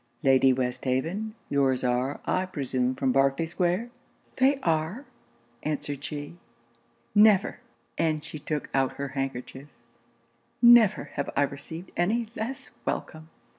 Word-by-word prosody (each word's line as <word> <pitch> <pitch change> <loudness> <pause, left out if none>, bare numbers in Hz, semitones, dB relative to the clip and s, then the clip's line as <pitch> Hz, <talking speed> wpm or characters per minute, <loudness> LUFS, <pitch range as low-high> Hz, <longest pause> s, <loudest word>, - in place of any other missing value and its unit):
Lady 135 -1 +5
Westhaven, 130 - -1
your's 135 -2 +1
are, 125 +2 0
I 185 0 0
presume, 130 -6 -1
from 130 0 +1
Berkley 135 +4 +2
square?' 180 +7 -1 0.5
'They 270 +1 +3
are,' 165 - 0 0.6
answered 145 -2 -3
she. 145 +3 -6 0.8
'Never,' 210 0 +5 0.4
and 155 -2 +1
she 155 - -7
took 150 0 -3
out 135 -1 +1
her 140 0 -5
handkerchief 135 0 -5 0.9
'never 235 -4 +6
have 140 - -3
I - - +4
received 145 +5 -6
any 215 +6 0
less 245 +5 -5
welcome!' 155 0 -4
150 Hz, 120 wpm, -27 LUFS, 135-185 Hz, 0.9 s, never